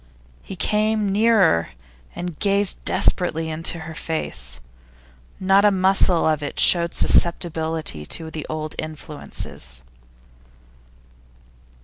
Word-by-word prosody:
He 195 - -9
came 215 +1 0
nearer, 200 - +3 0.5
and 175 -3 -6
gazed 200 -1 +1
desperately 160 -3 +1
into 165 +1 -2
her 160 0 -8
face. 155 - -4 0.8
Not 195 +1 +4
a 210 - +6
muscle 190 -2 +2
of 155 -1 +1
it 145 - -5
showed 170 -1 +4
susceptibility 160 - +1
to 160 -1 -3
the 155 -1 -6
old 155 0 -4
influences. 150 - -7
165 Hz, 100 wpm, -22 LUFS, 155-195 Hz, 0.8 s, a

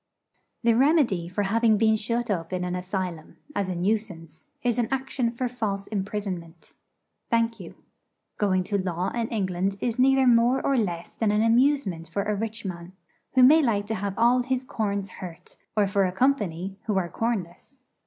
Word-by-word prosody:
The 235 0 +4
remedy 245 - +3
for 205 +3 -1
having 220 +2 +3
been 220 0 +4
shut 230 +1 -1
up 165 -3 -2
in 180 -1 -2
an 180 0 -2
asylum, 180 -3 -4 0.2
as 200 -2 -1
a 180 - -2
nuisance, 175 -5 -3 0.2
is 245 -1 +1
an 235 - +1
action 265 -2 -1
for 245 +2 -3
false 215 -5 -3
imprisonment. 190 -5 -5 0.6
Thank 230 0 +1
you. - - -10 0.6
Going 185 -3 +2
to 200 +2 -1
law 180 0 -2
in 235 -1 -2
England 195 -3 -1
is 240 +2 -2
neither 265 +1 +5
more 240 +2 +4
or 275 - +2
less 175 -8 -2
than 220 - 0
an 210 +1 +2
amusement 230 - +2
for 200 +4 -1
a 210 - -1
rich 220 +1 -4
man, 175 -1 -6 0.4
who 255 - +6
may 305 +5 +7
like 215 -7 +1
to 220 - -3
have 200 -1 -3
all 240 +2 +4
his 255 +1 -1
corns 200 -5 -3
hurt, 175 -3 -8 0.2
or 210 - +4
for 200 0 +2
a 180 - -1
'company,' 195 -5 0
who 210 -3 +1
are 180 -2 0
cornless. 220 +3 -4
210 Hz, 180 wpm, -26 LUFS, 185-235 Hz, 0.6 s, may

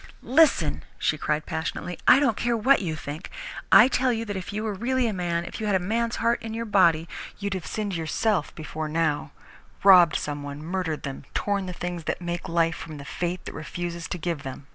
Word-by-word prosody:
"Listen," 310 +3 +3
she - - +1
cried 150 0 -1
passionately, 170 +2 -4
"I - - +8
don't 270 -7 +2
care 235 +1 0
what 260 +4 +4
you 165 -5 -2
think! 155 +2 -7 0.4
I - - +9
tell 260 -1 +2
you 230 -1 -2
that 205 -2 -4
if 190 +1 -5
you 210 +1 -3
were 215 -2 -2
really 250 +5 0
a 225 - 0
man, 170 -2 -1
if - - -7
you 215 - -2
had 205 - +2
a - - +3
man's 230 +5 -1
heart 230 +1 +1
in 225 0 -5
your 230 0 -3
body, 170 -6 +3 0.3
you'd 200 -1 -3
have 185 -3 -5
sinned 210 -2 -3
yourself 170 +2 0
before 155 -1 -5
now 155 -1 0 0.5
robbed 180 -5 +8
some 145 -1 -2
one, 145 +1 -7
murdered 165 -2 -2
them, 140 -1 -6
torn 200 -2 0
the - - -3
things 175 -2 -5
that - - -2
make 175 -1 -4
life 165 0 +1
from 155 -2 -8
the 140 - -9
fate 175 +5 -3
that - - -6
refuses 170 +1 -5
to 180 - -4
give 170 -3 -3
them. 135 0 -8
180 Hz, 220 wpm, -26 LUFS, 160-215 Hz, 0.5 s, I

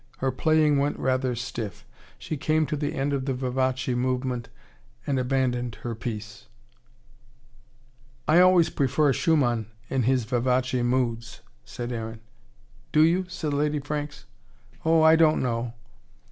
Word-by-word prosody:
Her 135 0 0
playing 150 +3 +3
went 145 +1 0
rather 130 -1 0
stiff. 115 -3 -6 0.3
She 155 - -5
came 155 +2 +1
to 150 +2 -2
the 145 0 -3
end 140 +1 -1
of 135 -2 -1
the 135 -2 -1
vivace 130 0 -1
movement, 125 -1 -2 0.6
and 135 -2 0
abandoned 125 -2 -1
her 120 - -3
piece. 110 -2 -7 1.8
"I 160 +3 +5
always 180 -3 +5
prefer 140 +1 +2
Schumann 120 - +1 0.2
in 135 - +1
his 125 0 +1
vivace 125 +2 0
moods," 120 -2 -1 0.2
said 120 0 -6
Aaron. 115 -1 -5 0.7
"Do 155 - +5
you?" 175 +4 +2
said 160 -5 -4
Lady 150 +1 +1
Franks. 145 0 -5 0.6
"Oh, 160 0 +4
I 160 0 +7
don't 160 -1 +4
know." 120 -1 -2
130 Hz, 135 wpm, -26 LUFS, 120-150 Hz, 1.8 s, I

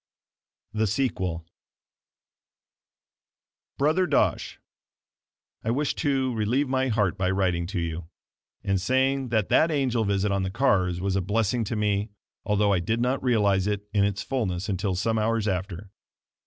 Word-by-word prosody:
The 110 0 +1
Sequel 95 -8 -1 2.3
Brother 155 +6 +2
Dosh: - - 0 1.0
I 110 - -2
wish 140 +5 0
to 135 -3 0
relieve 120 +6 0
my 130 0 0
heart 105 -5 0
by 90 -1 +1
writing 90 -3 0
to 95 -1 -3
you, 85 0 -4 0.6
and 95 -1 0
saying 130 +3 +1
that 110 -3 0
that 145 +7 +4
angel 130 -7 +1
visit 100 0 0
on 100 0 0
the 95 - -1
cars 95 -6 +1
was 95 +1 -1
a 95 - +1
blessing 110 +4 0
to 110 - -3
me, 105 0 0 0.3
although 105 -1 +2
I 95 - +2
did 110 +7 -1
not 125 +3 0
realize 105 -6 +2
it 105 0 -2
in 100 -2 +3
its 100 0 -1
fullness 95 -9 -2
until 95 -1 -1
some 110 +5 0
hours 110 0 0
after. 95 0 -3
105 Hz, 150 wpm, -26 LUFS, 95-125 Hz, 2.3 s, that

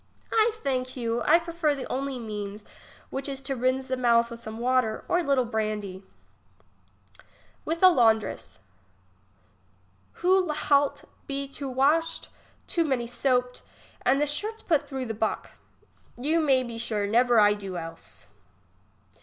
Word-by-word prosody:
I 445 0 +5
thank 255 -1 -2
you; 235 -1 -1
I 320 - +5
prefer 335 -3 -1
the 270 - -5
only 275 0 -3
means, 210 -2 -6 0.5
which 270 +1 -2
is 270 -1 -5
to 270 0 -2
rinse 260 +1 0
the 260 - -1
mouth 235 -2 +3
with 230 - -7
some 220 -1 -8
water, 245 -2 0
or 355 - +2
a - - -1
little 275 -4 +2
brandy. 215 -4 -3 1.7
IFith 330 +3 -2
a - - +11
laundress. 225 - +1 1.6
Who 370 +1 +2
Ihat 285 -1 +1 0.2
be 275 0 -3
too 275 0 -6
washed, 295 +6 +1 0.4
too 340 - +1
many 265 -6 0
soaped, 250 0 0 0.4
and 265 +2 +3
the 295 - +3
shirts 430 +10 -4
put 300 -4 +1
through 265 -2 -4
the 225 - -3
buck. 220 0 -2 0.7
You 305 +7 +1
may 270 -5 +3
be 235 -2 -6
sure; 215 -3 -1
never 235 +2 +4
I 205 0 +6
do 195 -3 -6
else. 165 -1 -9
255 Hz, 145 wpm, -27 LUFS, 230-290 Hz, 1.7 s, a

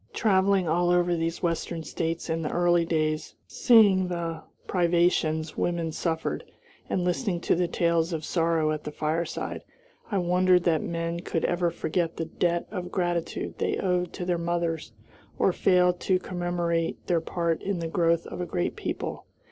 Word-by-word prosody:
Traveling 195 -3 +3
all 175 +2 +2
over 175 0 +3
these 165 +1 -2
Western 170 -1 -1
States 165 +1 -3
in 165 0 -1
the 155 - -2
early 175 -1 +3
days, 155 -2 -1
seeing 205 -6 +5
the 170 -2 -3 0.2
privations 170 -3 +1
women 170 -2 -1
suffered, 160 0 -2 0.5
and 180 - 0
listening 175 +1 0
to - - +2
the 175 0 +1
tales 170 0 +1
of 160 -2 -3
sorrow 165 -2 +1
at 155 -1 -3
the 150 - -5
fireside, 155 +3 -2 0.5
I 205 - 0
wondered 180 0 +3
that 165 -3 +2
men 170 0 -3
could 165 -1 -2
ever 175 0 +1
forget 165 0 -2
the 165 - -2
debt 170 +1 0
of 180 -3 -5
gratitude 175 -3 -2
they - - 0
owed 180 -1 0
to 180 - -5
their 175 -1 0
mothers, 170 -4 -2 0.5
or 190 - +3
fail 180 -1 +4
to 185 +1 +1
commemorate 175 -2 -2
their 170 -3 +1
part 170 -1 -1
in 200 -1 -2
the 165 -1 -3
growth 165 0 +1
of - - -6
a 175 - -3
great 90 - -1
people. - - -4
170 Hz, 165 wpm, -27 LUFS, 165-180 Hz, 0.5 s, seeing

